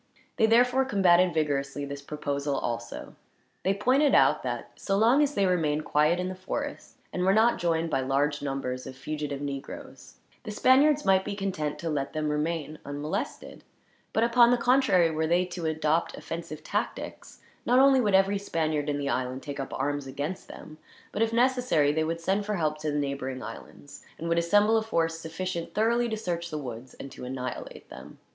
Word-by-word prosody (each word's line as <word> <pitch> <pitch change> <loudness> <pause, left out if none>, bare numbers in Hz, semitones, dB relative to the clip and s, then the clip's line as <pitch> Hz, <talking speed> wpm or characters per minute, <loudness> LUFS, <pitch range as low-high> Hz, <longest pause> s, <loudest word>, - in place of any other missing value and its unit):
They 220 - +4
therefore 245 +3 +4
combated 185 -6 +4
vigorously 145 -3 -1
this 140 0 -7
proposal, 140 -1 -3
also. 115 -2 -5 0.5
They 195 +1 +1
pointed 265 +8 +3
out - - +4
that, - - -4
so 195 -1 -1
long 235 +7 +5
as 290 -1 +1
they 200 - +2
remained 155 -5 +1
quiet 155 +4 +2
in 180 - -1
the 185 - -4
forest, 185 +1 -5 0.2
and 180 - -2
were 190 +2 +4
not 225 +2 +4
joined 165 -1 0
by 135 - +1
large 140 +3 0
numbers 135 -2 -3
of 130 - -8
fugitive 145 0 -4
negroes, 140 -1 -7 0.3
the 225 - -8
Spaniards 275 +7 +4
might 190 0 +4
be 200 +1 -4
content 180 -7 -3
to 170 - -4
let 140 -2 -2
them 155 -1 -1
remain 155 0 -2
unmolested; 145 +2 -5 0.5
but 220 - +1
upon 235 0 +5
the 245 - +4
contrary, 235 -9 +3
were 160 0 -1
they 175 +2 +2
to 175 -2 -4
adopt 160 +1 0
offensive 165 -2 -7
tactics, - - -4 0.2
not 245 - +3
only 270 0 +6
would 205 -4 +2
every 195 +1 +3
Spaniard 155 -6 -1
in 145 - 0
the 140 -1 -3
island 130 0 -2
take 145 -1 -6
up 135 - -4
arms 145 0 -2
against 145 +7 -5
them, 155 0 -11 0.3
but 210 - -3
if 225 0 +2
necessary 245 - +2
they 160 +1 0
would 165 +1 -2
send 190 +4 0
for 210 +1 -2
help 155 -4 -1
to 155 0 -2
the 145 - -1
neighboring 140 -2 -3
islands, 145 0 -10
and 165 - -5
would 170 0 +2
assemble 205 +6 +4
a - - +2
force 165 -6 -1
sufficient 170 +1 -5
thoroughly 235 +2 +2
to 220 - -2
search 170 -4 -3
the 155 - -4
woods, 125 -3 -7
and 135 - -9
to - - -10
annihilate 125 0 -6
them. - - -11
165 Hz, 190 wpm, -27 LUFS, 145-205 Hz, 0.5 s, only